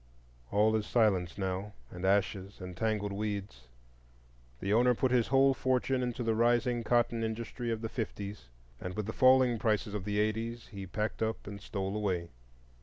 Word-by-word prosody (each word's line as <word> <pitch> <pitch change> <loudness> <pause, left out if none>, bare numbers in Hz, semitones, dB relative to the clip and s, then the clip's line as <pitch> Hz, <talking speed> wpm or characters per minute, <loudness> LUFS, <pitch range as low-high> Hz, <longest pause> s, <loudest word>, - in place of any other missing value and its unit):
All 105 +2 +3
is 110 -1 -1
silence 95 -7 +2
now, 95 +1 -3 0.2
and 90 0 -8
ashes, 100 0 0
and 90 -1 -7
tangled 105 0 -1
weeds. 100 - -4 0.9
The 100 +1 0
owner 125 +2 +4
put 130 +2 +1
his 125 -3 +3
whole 135 0 +5
fortune 130 0 +1
into 125 0 -2
the 115 -1 +1
rising 120 +1 +2
cotton 120 0 +2
industry 115 +2 -3
of 115 -1 -2
the 115 - -2
fifties, 100 - -5 0.3
and 90 0 -5
with 105 - -2
the 110 - -4
falling 130 -2 +5
prices 105 -1 0
of 105 -3 -3
the 105 0 -1
eighties 115 +2 -1
he 100 -3 -7
packed 105 +5 -3
up 110 0 -1
and 100 0 -7
stole 95 0 -3
away. 95 -5 -1
110 Hz, 175 wpm, -31 LUFS, 100-120 Hz, 0.9 s, whole